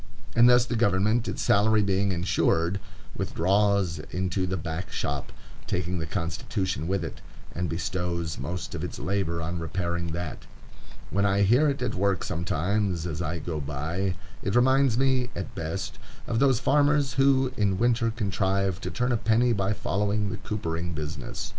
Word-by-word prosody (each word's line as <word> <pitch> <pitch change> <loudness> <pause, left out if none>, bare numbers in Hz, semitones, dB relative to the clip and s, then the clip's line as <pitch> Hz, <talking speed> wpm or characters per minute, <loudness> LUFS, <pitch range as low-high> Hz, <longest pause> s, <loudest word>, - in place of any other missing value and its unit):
And 120 +1 +7
thus 125 -1 +6
the 120 - -2
government, 110 +1 +2
its - - -2
salary 105 +1 +4
being 100 0 +1
insured, 85 0 +1 0.4
withdraws 100 -2 +1
into 95 +1 -1
the 95 +1 -1
back 80 +3 -5
shop, - - -3 0.4
taking 90 +2 -1
the 80 - -3
Constitution 85 -1 -2
with 95 -2 0
it, - - -8 0.3
and 90 -1 -2
bestows 85 0 -2
most 90 +1 -4
of - - -4
its - - -4
labor 90 -4 -1
on 85 +2 -3
repairing 85 +1 -2
that. 85 -2 -5 0.6
When 100 - +1
I 100 0 +3
hear 125 +10 +5
it 140 - -2
at - - -1
work 95 +1 +1
sometimes, 90 +2 -1
as 80 -1 -3
I 85 0 -2
go 80 -2 -4
by, 80 +7 -2 0.3
it 100 - -1
reminds 130 -1 +4
me, 130 -1 +2
at 95 - -5
best, 80 +4 -4 0.3
of 115 - -1
those 135 -3 +4
farmers 145 +1 +3
who 135 -1 +3
in 100 -5 +1
winter 120 +1 +2
contrive 100 -3 0
to - - -3
turn 125 +1 0
a 120 - +2
penny 115 +3 +3
by 100 -1 0
following 105 0 0
the - - -4
coopering 85 -4 -3
business. 75 -2 -5
95 Hz, 165 wpm, -27 LUFS, 85-110 Hz, 0.6 s, And